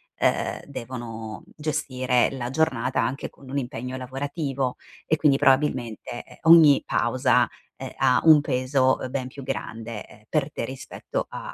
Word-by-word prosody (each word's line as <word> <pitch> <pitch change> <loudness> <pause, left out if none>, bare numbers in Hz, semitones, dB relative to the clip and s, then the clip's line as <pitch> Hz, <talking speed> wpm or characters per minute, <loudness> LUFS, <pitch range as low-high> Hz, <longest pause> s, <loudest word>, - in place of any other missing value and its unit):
ehm, - - 0
devono 115 -5 -7
gestire 130 -5 0
la 125 -2 -4
giornata 130 -4 0
anche 130 +4 -2
con 135 -2 -16
un 140 - 0
impegno 125 0 -5
lavorativo 135 0 -3 0.3
e 155 - +2
quindi 140 -3 +4
probabilmente, 130 -5 +1
ehm, - - -17
ogni 155 -4 +8
pausa, - - +2 0.3
ehm, - - -7
ha 125 - +3
un 155 -2 +8
peso, 130 -1 +1
ben 130 0 -3
più 135 +1 -10
grande 115 -4 -6
per 150 -2 0
te - - -4
rispetto 130 +2 -5
a - - -7
130 Hz, 140 wpm, -25 LUFS, 120-140 Hz, 0.3 s, ogni